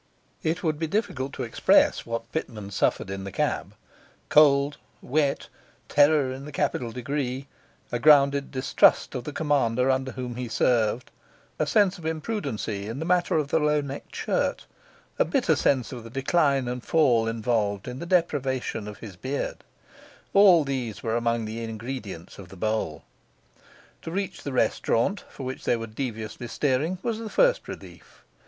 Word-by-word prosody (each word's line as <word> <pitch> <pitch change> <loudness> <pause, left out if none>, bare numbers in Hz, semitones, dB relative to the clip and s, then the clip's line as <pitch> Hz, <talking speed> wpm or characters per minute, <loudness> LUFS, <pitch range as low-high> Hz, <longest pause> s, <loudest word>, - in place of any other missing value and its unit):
It 165 +4 -1
would 155 -3 0
be 165 - -1
difficult 150 - -2
to 130 - -4
express 115 - +3
what 115 0 -4
Pitman 105 -10 -5
suffered 95 0 0
in 95 0 -5
the 100 - -6
cab: - - -2 0.5
cold, 145 -1 +5 0.2
wet, 140 +1 0 0.4
terror 145 -2 +4
in 130 +1 -7
the 150 - -8
capital 135 -4 -1
degree, 130 +1 -3 0.5
a 120 - -1
grounded 140 0 +5
distrust 130 0 +3
of 125 -3 -5
the - - -4
commander 135 -4 +1
under 130 0 -1
whom 125 -2 -5
he 125 -1 -3
served, 115 +1 +1 0.5
a - - +1
sense 200 -3 +3
of - - -12
imprudency 145 - -3
in 115 +3 -5
the 160 - -3
matter 180 -1 +2
of 150 -2 -1
the 160 - +2
low 150 0 +2
necked 140 -1 -7
shirt, - - -1 0.5
a - - +6
bitter - - +2
sense 130 -5 +1
of 120 -3 -7
the 115 - -10
decline 135 0 +1
and 125 0 -4
fall 125 -8 +3
involved 110 -3 -1
in 125 +1 -6
the 170 - -6
deprivation 135 - 0
of 105 - -8
his 100 -4 -9
beard, 135 +9 -4 0.7
all 190 -5 +7
these 130 -6 -4
were 115 0 0
among 115 -1 0
the 110 +2 -5
ingredients 110 -6 -7
of 95 -3 -10
the 95 - -12
bowl. 110 -7 -2 1.0
To - - -7
reach 195 +3 -3
the 140 - -5
restaurant, 130 - +1
for 135 - -9
which 130 0 -5
they - - +2
were 115 - -5
deviously 110 0 -5
steering, 145 +8 0
was 230 -2 -1
the 225 -1 -5
first - - +3
relief. - - -11
130 Hz, 165 wpm, -26 LUFS, 115-150 Hz, 1.0 s, all